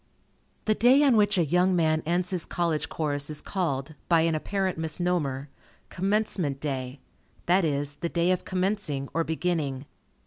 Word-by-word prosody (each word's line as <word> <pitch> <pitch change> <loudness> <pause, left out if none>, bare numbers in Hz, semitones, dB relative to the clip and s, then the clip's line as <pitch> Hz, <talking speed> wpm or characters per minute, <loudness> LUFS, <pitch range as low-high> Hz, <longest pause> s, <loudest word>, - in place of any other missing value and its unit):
The 215 - +3
day 250 +6 +5
on 270 -4 +5
which 210 -1 +3
a 170 - +3
young 180 +4 +2
man 160 -2 +2
ends 175 +2 0
his 180 -3 -1
College 170 -3 -1
course 145 -2 -2
is 150 -1 -4
called, 155 -6 -2 0.2
by 165 -2 +5
an 165 0 +2
apparent 190 +2 -1
misnomer, 160 -4 -1 0.4
"Commencement" 190 -7 -1
day; 135 -2 -4 0.4
that 180 +2 +3
is, 145 -2 -1
the 170 +3 -3
day 170 +1 +1
of 185 - 0
commencing, 185 -7 -2
or 165 - +1
beginning. 160 -5 -2
170 Hz, 160 wpm, -27 LUFS, 145-185 Hz, 0.4 s, day